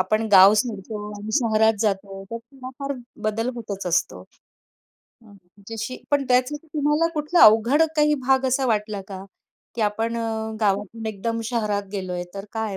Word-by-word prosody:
आपण 215 +4 0
गाव 195 +2 +9
सोडतो 215 -1 -2 0.2
आणि 215 +1 -7
शहरात 220 -4 +3
जातो, 195 -2 -2
तर 230 - -3
थोडाफार 265 +3 -7 0.3
बदल 220 +3 -1
होतच 205 -5 -6
असतो. 175 -1 0 1.0
हं. 205 -3 -17 0.3
जशी 225 +3 -5
पण 285 -1 +2
त्याचा 250 +3 +2
तुम्हाला 300 +2 +1
कुठला 305 +3 +2
अवघड 225 +8 +5
काही 300 0 +4
भाग 265 0 +3
असा 265 +1 +1
वाटला 210 -3 -1
का, 190 -1 -8 0.5
की 235 - -4
आपण 225 +2 -1
अ, 230 - -2 0.3
गावातून 205 +2 -1
एकदम 225 +2 -3
शहरात 210 -4 -1
गेलोय, 185 -3 -4
तर 195 - -6
काय 220 -3 -3
225 Hz, 150 wpm, -23 LUFS, 205-255 Hz, 1.0 s, गाव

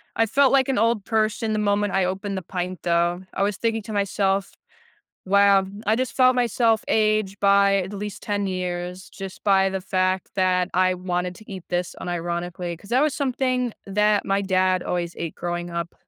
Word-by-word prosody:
I 225 - +3
felt 275 +4 +3
like 270 -1 +4
an 265 -6 +1
old 225 -3 +1
person 220 0 0
the 215 - 0
moment 205 -1 +1
I 190 -1 +2
opened 195 +1 -3
the - - -3
pint 180 0 -5
though. 175 +1 +1
I 195 - +1
was 200 -2 0
thinking 225 -2 -1
to 215 - -7
myself, 195 -1 0 0.7
"Wow." 200 0 +4 0.2
I 220 +1 +3
just 255 -1 -2
felt 255 -1 +5
myself 230 -2 +2
age 215 -2 +1
by 200 0 +4
at 195 +1 -3
least 205 0 -6
10 205 -1 -1
years 180 0 -4
just 195 -2 -9
by 195 -1 +3
the 190 0 -3
fact 185 0 0
that 185 -1 +2
I 185 0 +3
wanted 180 0 -3
to 215 - -15
eat 190 -3 -7
this 175 0 -2
unironically, 175 0 -4
'cause 200 - -16
that 250 +2 +3
was 300 -2 +1
something 255 -3 -1
that 210 +1 +2
my 195 +1 +1
dad 185 -1 +1
always 175 -1 -3
ate 165 - -5
growing 175 0 -4
up 170 0 -4
195 Hz, 190 wpm, -23 LUFS, 180-215 Hz, 0.7 s, felt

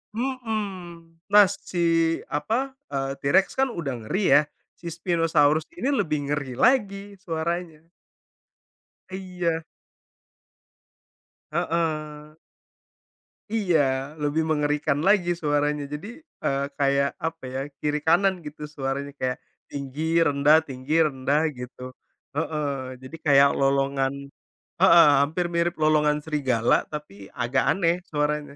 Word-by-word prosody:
Mhm. 200 -10 -5
Nah, 205 0 +7
si 185 -2 -6 0.5
apa, 230 - -1 0.2
eee, 135 -1 -2
T-Rex 165 +8 +3
kan 270 - +4
udah 170 - -4
ngeri 190 - 0
ya, - - +3 0.4
si 170 - -9
Spinosaurus 165 -3 +1
ini 280 -6 -1
lebih 150 - -1
ngeri 135 -4 -3
lagi 200 - +2 0.2
suaranya. 165 -1 -4 1.2
Iya. 180 -3 -3 1.9
Heeh. 155 -2 -2 1.2
Iya, 190 -8 +2 0.4
lebih 150 +2 0
mengerikan 150 -1 0
lagi 195 -4 +4
suaranya. 145 -1 0
Jadi, 150 +7 -6 0.4
eee, 140 0 0
kayak, 140 0 +2 0.2
apa 165 -1 -4
ya, 130 - -2 0.2
kiri 150 0 -1
kanan 190 +4 +4
gitu 150 +1 -9
suaranya. 140 +1 -3
Kayak, 130 0 -1 0.3
tinggi, 140 +1 -6 0.3
rendah, 145 +2 +5
tinggi, 130 +2 -5
rendah, 140 +1 0 0.2
gitu, 125 0 -9 0.5
heeh. 150 -1 -1 0.3
Jadi 130 +5 -9
kayak 140 -1 +6
lolongan 135 0 +1 0.7
heeh, 170 -3 +7 0.2
hampir 160 +5 -1
mirip 170 0 +1
lolongan 150 -1 +3
serigala 130 -7 +1 0.2
tapi 150 -6 -7 0.2
agak 120 +2 0
aneh, 170 -3 +2
suaranya. 150 -1 -2
155 Hz, 110 wpm, -25 LUFS, 140-175 Hz, 1.9 s, Nah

